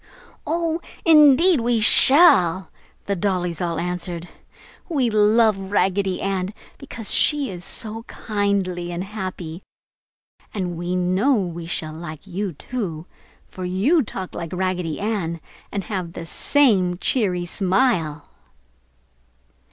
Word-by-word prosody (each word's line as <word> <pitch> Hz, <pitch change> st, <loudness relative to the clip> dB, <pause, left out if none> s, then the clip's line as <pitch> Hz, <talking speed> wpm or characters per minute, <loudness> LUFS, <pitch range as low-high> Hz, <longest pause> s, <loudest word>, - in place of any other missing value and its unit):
"Oh, 330 Hz, +1 st, -1 dB, 0.2 s
indeed 310 Hz, +1 st, +6 dB
we 235 Hz, 0 st, +1 dB
shall!" 195 Hz, -, +5 dB, 0.3 s
the 200 Hz, -, -1 dB
dollies 180 Hz, -2 st, -1 dB
all 170 Hz, -2 st, -1 dB
answered. 175 Hz, 0 st, -4 dB, 0.6 s
"We 265 Hz, -8 st, +1 dB
love 215 Hz, +1 st, +4 dB, 0.2 s
Raggedy 195 Hz, -1 st, +1 dB
Ann 195 Hz, +1 st, -2 dB, 0.2 s
because 235 Hz, -6 st, -3 dB
she 290 Hz, -7 st, +2 dB
is 175 Hz, -1 st, -7 dB
so 220 Hz, +3 st, -3 dB
kindly 200 Hz, -4 st, -2 dB
and 175 Hz, +1 st, -3 dB
happy, 185 Hz, -4 st, -6 dB, 0.9 s
and 180 Hz, -4 st, -2 dB
we 175 Hz, +2 st, -3 dB
know 185 Hz, +9 st, +2 dB
we 175 Hz, -5 st, -3 dB
shall 155 Hz, -2 st, -3 dB
like 160 Hz, +1 st, -8 dB
you 195 Hz, 0 st, -4 dB
too, 170 Hz, -, -5 dB, 0.4 s
for 185 Hz, -, -8 dB
you 200 Hz, -, +2 dB
talk 190 Hz, -6 st, -5 dB
like 165 Hz, 0 st, -6 dB
Raggedy 180 Hz, -3 st, -2 dB
Ann 195 Hz, -6 st, -2 dB, 0.3 s
and 200 Hz, -, -3 dB
have 180 Hz, -3 st, -4 dB
the 165 Hz, -, -7 dB
same 190 Hz, -, +2 dB
cheery 185 Hz, -5 st, 0 dB
smile!" 180 Hz, -, 0 dB
190 Hz, 120 wpm, -22 LUFS, 175-225 Hz, 0.9 s, indeed